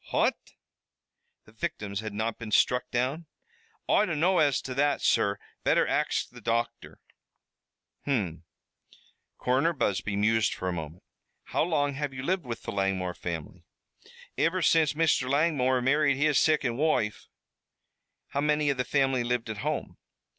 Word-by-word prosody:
"Phat?" - - +2 1.1
"The - - -18
victims 105 -2 -4
had 110 0 -5
not 110 +2 -3
been 115 -2 -6
struck 125 +3 +2
down?" 135 +7 -1 0.6
"Oi 210 - +3
dunno 170 +3 +2
as 145 -4 +3
to 130 - -5
that, 145 +2 +1
sur 100 -3 +2 0.3
better - - +3
axed - - -1
the - - -12
docther." 115 +1 -2 1.1
"Hum!" 95 - -1 0.9
Coroner 135 +7 +1
Busby 105 - -1
mused 110 +1 +2
for 95 - -4
a 90 - -1
moment. 80 0 -7 0.4
"How - - -1
long 145 -4 +1
have 140 -1 -4
you 130 - -5
lived 180 +1 -1
with 115 -2 -6
the - - -4
Langmore 95 -2 -1
family?" 85 0 -6 0.8
"Iver 175 +2 +1
since 160 -2 +4
Mr. 150 -5 +2
Langmore 135 -4 +2
married 140 +1 +3
his 145 -1 +3
sicond 145 -7 +2
woife." 145 -9 0 1.0
"How 140 - -1
many 150 0 +2
of 135 - -3
the 125 - +1
family 135 -3 +1
lived 120 -2 -1
at 110 - -6
home?" - - -3
130 Hz, 145 wpm, -28 LUFS, 110-150 Hz, 1.1 s, since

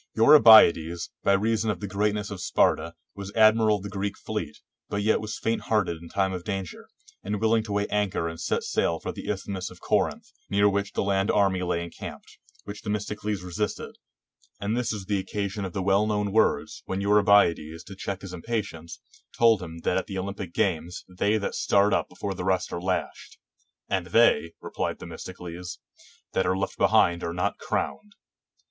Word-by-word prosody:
Eurybiades, 110 - +7
by 100 - +4
reason 110 +2 +1
of 105 - -1
the 105 - -5
greatness 105 +1 -1
of 95 -3 -6
Sparta, - - +1 0.2
was 100 0 -7
admiral 110 -1 +5
of 95 - -11
the 100 - -5
Greek 100 0 -3
fleet, 105 -9 -5 0.3
but 100 0 -2
yet 110 0 +2
was 110 0 -5
faint 115 0 -1
hearted 95 -7 +1
in 85 - -11
time 95 -1 0
of 90 -1 -5
danger, 95 -3 -5 0.3
and 105 +1 -2
willing 110 +1 +3
to 110 -1 -8
weigh 100 0 +1
anchor 105 -5 0
and 80 0 -6
set - - -1
sail 85 -1 0
for - - -4
the - - -8
Isthmus 100 -2 -3
of 90 - -14
Corinth, - - -1 0.2
near 100 +1 +3
which 100 0 -1
the - - 0
land 100 0 +1
army 95 -3 +2
lay 85 -1 -1
encamped; 85 - -10 0.2
which 100 0 -8
Themistocles 105 -1 -3
resisted; 90 +4 -4 0.6
and 105 +3 -1
this 125 -1 -1
was 105 -3 -5
the 100 0 0
occasion 100 +1 -3
of 90 - -6
the 95 - -2
well 100 +2 +3
known 105 -1 -1
words, 110 - +1
when 95 - -2
Eurybiades, 100 -6 +3
to 95 - -11
check 100 0 -5
his 95 -2 -8
impatience, 90 -4 -5 0.4
told 115 -4 +5
him 85 -2 -8
that 90 - 0
at - - -7
the 95 - -5
Olympic 95 -1 -5
games 85 -1 -1
they 100 +4 0
that 100 - -3
start 100 0 +2
up - - 0
before 100 - -5
the 90 - -6
rest 95 -1 0
are 85 - -3
lashed; 95 0 -3 0.5
"And 95 -2 -1
they," 90 -5 +3
replied - - -3
Themistocles, 90 0 -8 0.6
"that 95 - +1
are 95 - +1
left 95 0 -3
behind 85 0 +3
are 85 - -3
not 90 - -1
crowned." 85 +9 -3
100 Hz, 185 wpm, -26 LUFS, 90-105 Hz, 0.6 s, Eurybiades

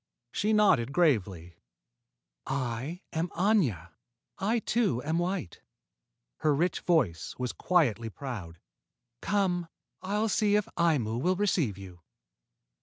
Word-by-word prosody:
She 215 - 0
nodded 195 - +3
gravely. 100 - +1 0.9
"I 135 +5 -3
am 165 +2 -1
Aña. 155 - +1 0.5
I, 210 +5 +1
too, 215 - 0
am 160 +3 0
white." 175 - -3 0.8
Her 150 -2 +2
rich 175 +5 0
voice 120 - 0
was 125 -1 -2
quietly 120 - +1
proud. 105 -9 -7 0.6
"Come; 185 -4 0 0.3
I'll 210 +3 0
see 210 0 +2
if 210 -1 +1
Aimu 135 -10 +1
will 185 +4 +2
receive 175 - 0
you." 90 -3 -11
160 Hz, 110 wpm, -29 LUFS, 115-190 Hz, 0.9 s, nodded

